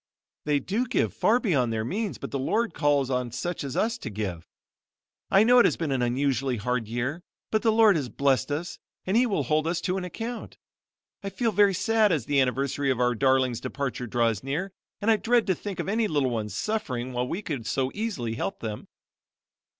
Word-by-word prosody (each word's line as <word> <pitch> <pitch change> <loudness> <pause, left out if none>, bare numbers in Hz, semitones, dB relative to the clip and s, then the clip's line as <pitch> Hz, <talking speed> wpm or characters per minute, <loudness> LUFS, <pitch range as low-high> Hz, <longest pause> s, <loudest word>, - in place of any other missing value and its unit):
"They 150 -1 +2
do 215 - -1
give 240 - 0
far 235 +3 +3
beyond 140 - +1
their 110 -1 -2
means 205 - -2
but - - -7
the 140 - -2
Lord 215 - 0
calls 145 -3 +1
on 125 -2 -1
such 175 +8 -3
as 135 -2 -4
us 230 +2 0
to - - -5
give. 95 -6 -5 0.8
I 195 +2 +6
know 245 +2 +6
it - - +6
has - - +2
been 160 -4 -2
an 130 -2 0
unusually 130 +1 0
hard 120 +1 -1
year 125 +9 -3 0.3
but 215 - +2
the 225 - +3
Lord 220 -3 +5
has 135 -5 -3
blessed 140 +2 +1
us 160 +5 -4 0.3
and 190 - 0
He 245 +2 +4
will 195 -10 0
hold 155 +4 +1
us 170 0 0
to 185 0 -1
an 190 - -3
account. 225 +6 -6 0.7
I 200 - -3
feel 225 +4 0
very 205 -2 +4
sad 220 +1 +3
as 150 -9 0
the 140 -1 +3
anniversary 135 +2 0
of 130 -2 +1
our 125 0 +3
darlings' 130 0 +2
departure 130 -3 -3
draws 115 -3 +1
near 150 +9 -3 0.3
and 220 +2 +3
I 220 - +4
dread 235 +1 +2
to 190 - +2
think 200 +1 -6
of - - -2
any 220 +2 +1
little 145 -8 +1
ones 110 -3 -3
suffering 130 - -2
while 125 0 -1
we 185 +10 -4
could 135 - -4
so 135 -1 0
easily 195 - -3
help 95 -3 -3
them." 105 -2 -6
145 Hz, 210 wpm, -26 LUFS, 125-205 Hz, 0.8 s, I